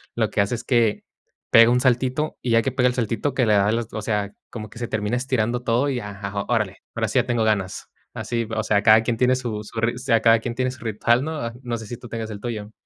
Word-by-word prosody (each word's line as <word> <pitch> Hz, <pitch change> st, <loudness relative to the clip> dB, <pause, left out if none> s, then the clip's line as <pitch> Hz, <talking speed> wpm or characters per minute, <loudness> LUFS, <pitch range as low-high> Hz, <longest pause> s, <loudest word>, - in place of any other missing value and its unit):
lo -, -, +1 dB
que -, -, +2 dB
hace 100 Hz, +3 st, -1 dB
es 115 Hz, -, -7 dB
que 120 Hz, -4 st, +2 dB, 0.5 s
pega 115 Hz, 0 st, +8 dB
un 125 Hz, -, +3 dB
saltito 130 Hz, +4 st, +1 dB
y 120 Hz, -, -2 dB
ya 115 Hz, 0 st, +5 dB
que 135 Hz, -, -2 dB
pega 125 Hz, -1 st, +3 dB
el 125 Hz, -, +1 dB
saltito 115 Hz, +3 st, -1 dB
que 130 Hz, -2 st, +2 dB
le 110 Hz, -, +3 dB
da 100 Hz, 0 st, +3 dB
el 115 Hz, +2 st, +1 dB
o 110 Hz, -, -3 dB
sea, 105 Hz, -1 st, -2 dB, 0.2 s
como 110 Hz, -2 st, -7 dB
que 115 Hz, -, -12 dB
se 120 Hz, -, -3 dB
termina 105 Hz, +1 st, -1 dB
estirando 125 Hz, -2 st, -1 dB
todo 120 Hz, +4 st, +1 dB
y 130 Hz, -3 st, -1 dB
ajá, 100 Hz, -1 st, -5 dB
órale, 105 Hz, -6 st, 0 dB, 0.2 s
ahora -, -, 0 dB
sí, -, -, -1 dB
ya -, -, +1 dB
tengo 120 Hz, -2 st, 0 dB
ganas. 100 Hz, -4 st, -1 dB, 0.3 s
Así, 115 Hz, -1 st, -3 dB
o 110 Hz, -, 0 dB
sea, 105 Hz, -2 st, +1 dB
cada 110 Hz, 0 st, +7 dB
quien 115 Hz, +1 st, -1 dB
tiene 125 Hz, +1 st, +3 dB
su 110 Hz, -4 st, -4 dB
su 115 Hz, +2 st, -7 dB
rit 115 Hz, +1 st, +1 dB
o -, -, -8 dB
sea, 115 Hz, -4 st, +2 dB
cada 115 Hz, 0 st, +5 dB
quien 120 Hz, +1 st, -5 dB
tiene 130 Hz, 0 st, 0 dB
su 130 Hz, -, -12 dB
ritual, 115 Hz, +3 st, +1 dB
¿no?, 150 Hz, -7 st, -3 dB
no 120 Hz, -1 st, -3 dB
sé 110 Hz, -2 st, -9 dB
si 120 Hz, -, -5 dB
tú 120 Hz, -, -12 dB
tengas 110 Hz, -1 st, -5 dB
el 100 Hz, -, -8 dB
tuyo. 110 Hz, -3 st, -5 dB
115 Hz, 270 wpm, -23 LUFS, 110-125 Hz, 0.5 s, pega